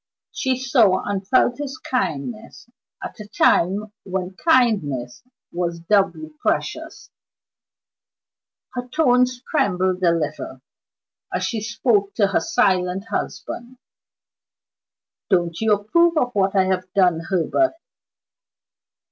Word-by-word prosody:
She 260 -3 -1
saw, 240 -7 +3
and 195 -1 -3
felt, 250 +2 +3
his 275 -2 -5
kindness 225 - -4 0.4
at - - -8
a 210 - -8
time 205 +2 +2
when 185 -1 -4
kindness 190 - +1 0.3
was 170 -1 -3
doubly 170 -4 +1
precious. - - -3 1.6
Her 245 -1 -5
tones 250 -3 +2
trembled 185 - +1
a 175 -2 +4
little 150 -5 -3 0.7
as - - -2
she 225 -3 -2
spoke 215 -3 0
to 210 - +3
her 200 - +1
silent 190 -2 0
husband. 245 +2 -5 1.5
"Don't 175 -2 +1
you 220 -1 +2
approve 330 +12 +2
of 250 -4 +1
what 195 -1 +1
I 190 - +5
have 185 -1 -2
done, 180 -4 +3
Herbert?" 185 - 0
200 Hz, 110 wpm, -22 LUFS, 180-245 Hz, 1.6 s, I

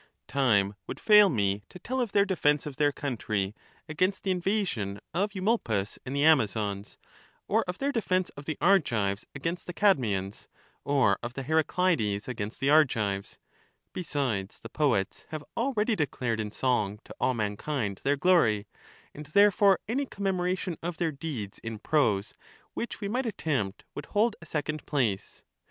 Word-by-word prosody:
Time 105 -8 +2
would - - -6
fail 210 -2 +7
me 100 - 0
to - - -11
tell 255 +7 -2
of 235 -5 -2
their 200 0 +4
defence 150 -6 +1
of 145 -3 -7
their 145 -1 +3
country 110 -8 -2 0.3
against 185 +5 0
the 195 - +1
invasion 180 - -1
of 200 +4 -1
Eumolpus 185 - 0
and 135 - -5
the 140 - +2
Amazons, 105 -9 +2 0.5
or 220 +2 +3
of 180 +1 -4
their 280 +1 0
defence 185 -7 0
of 145 - -11
the 155 - -3
Argives 115 - +2
against 165 +5 -4
the 175 - -5
Cadmeians, 105 - +1 0.4
or 140 -2 +2
of 120 +1 -6
the 135 - -4
Heracleids 155 - +1
against 110 -3 -5
the 135 +2 +2
Argives; 105 -10 +2 0.6
besides, 135 - -2
the 115 - -9
poets 120 -10 0
have 155 -2 -5
already 230 -2 +1
declared 125 - -1
in 105 -1 -2
song 105 -3 0
to - - -10
all 130 - +1
mankind 105 0 -2
their 145 +1 +2
glory, 125 - +3 0.5
and 150 0 -9
therefore 200 +2 +5
any 270 +5 -1
com 200 -4 -6
memoration 185 -2 -1
of 170 -1 -4
their 165 -2 0
deeds 135 -9 -6
in 115 -1 -6
prose 105 -6 +1 0.4
which 235 - -5
we 200 - -2
might 245 +4 -1
attempt 135 - -2
would 145 - -7
hold 215 +2 +2
a 170 - -12
second 155 0 -3
place. 120 -10 -1
145 Hz, 160 wpm, -28 LUFS, -, 0.6 s, fail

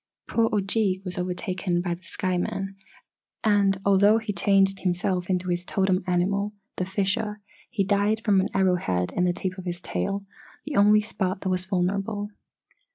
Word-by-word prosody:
"Poor 225 -1 +2
Ojeeg 195 -1 +1
was 180 0 -3
overtaken 180 0 -2
by 175 -1 -1
the 170 - -9
sky 185 0 -2
men 195 +1 -3 0.7
and, 200 -2 +3
although 200 +2 +5
he 220 -2 -3
changed 195 +1 +3
himself 180 0 -1
into 180 -1 0
his 175 0 0
totem 190 0 +1
animal, 200 +3 0 0.2
the 185 - -1
fisher, 205 +3 -1 0.3
he 220 -5 0
died 205 +2 +2
from 200 -3 +4
an 190 - 0
arrow 190 -2 +3
head 90 - -1
in 180 - +2
the 180 - +3
tip 185 +1 -4
of 185 - -8
his 175 -1 -3
tail 200 +1 -3 0.4
the - - -4
only 210 +1 +6
spot 195 -3 -2
that 190 - -2
was 185 0 0
vulnerable. 200 +2 -1
195 Hz, 170 wpm, -25 LUFS, 180-205 Hz, 0.7 s, only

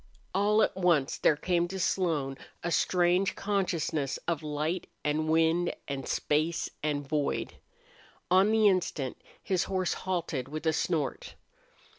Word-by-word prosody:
All 210 +3 +3
at - - 0
once 170 -7 +2
there 155 - +4
came 175 +2 0
to 190 +2 -5
Slone 160 -8 0 0.3
a 170 - -1
strange 180 +2 +2
consciousness 170 -8 -1
of 165 -3 0
light 155 +4 -2 0.2
and 155 +1 0
wind 165 +2 +2
and 135 -1 -4
space 155 +3 0
and 145 -2 -1
void. 145 -1 -1 0.8
On 190 +3 +5
the 220 -1 +4
instant 170 -9 0 0.2
his 185 -2 0
horse 185 -2 0
halted 170 -8 -3
with 155 +3 -6
a 160 - +3
snort. 155 -3 -2
170 Hz, 135 wpm, -29 LUFS, 150-185 Hz, 0.8 s, On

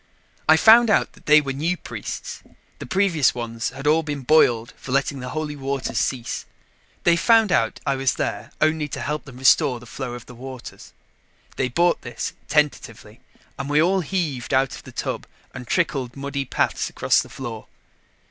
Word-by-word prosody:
I 160 - +8
found 230 +5 +7
out 205 - +2
that - - -21
they 155 0 +7
were 135 -2 -4
new 165 +6 -1
priests; - - -7 0.4
the - - -7
previous 180 -10 +2
ones 115 -1 -3
had 135 +3 -9
all 155 +2 +4
been 145 -3 -4
boiled 120 -5 +3
for 130 - -9
letting 140 +1 0
the 125 0 -6
Holy 155 -1 -4
Waters 135 -1 -2
cease. 120 -3 -2 0.6
They 170 - +5
found 225 +3 +4
out 115 -10 +1
I 140 - +1
was 135 -1 0
there - - -3
only 155 -1 +1
to - - -6
help 150 +1 -3
them 135 -3 -12
restore 130 0 +4
the 125 - -14
flow 125 0 -6
of 120 - -10
the 125 - -12
waters. 130 +1 -10 0.6
They 130 - -1
bought 170 +7 +2
this, 120 - -5
tentatively, 120 -7 -1 0.4
and 140 +1 -4
we 145 +1 +3
all 185 +4 +3
heaved 150 -7 -2
out 135 0 +2
of - - -10
the - - -10
tub - - -4 0.3
and 125 - -8
trickled 135 -8 -1
muddy 140 0 -4
paths - - -1
across - - +2
the - - -10
floor. 115 -5 -7
140 Hz, 185 wpm, -23 LUFS, 125-155 Hz, 0.6 s, I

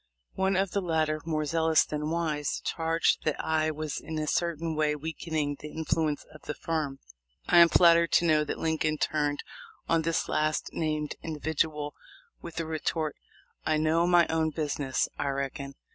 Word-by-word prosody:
One 190 0 +1
of 190 0 +1
the 200 - 0
latter, 155 -3 0
more 155 -2 -1
zealous 160 +1 +3
than 150 0 -3
wise, 155 -4 -1
charged 165 0 +1
that 155 - -1
I 155 0 +1
was 155 -1 -4
in 160 - -6
a 155 - -1
certain 165 0 -1
way 150 -1 +1
weakening 155 -1 -3
the 150 - -8
influence 155 -1 -1
of 155 - -13
the 150 - -5
firm. 155 -4 -2 0.5
I 175 - +6
am 170 0 +8
flattered 170 -1 +5
to 175 - +5
know 155 -2 +4
that - - -3
Lincoln 155 -1 0
turned 145 -1 0 0.4
on 165 -1 +3
this 165 0 0
last 155 0 0
named 155 -2 -2
individual 155 -1 -2 0.5
with 170 - -9
the 165 - -2
retort, 155 0 -2 0.5
"I 155 - +1
know 160 +2 +2
my 175 -1 +6
own 160 -1 +1
business, 145 -3 -1
I 145 - -1
reckon. 140 0 -3
155 Hz, 170 wpm, -28 LUFS, 150-165 Hz, 0.5 s, am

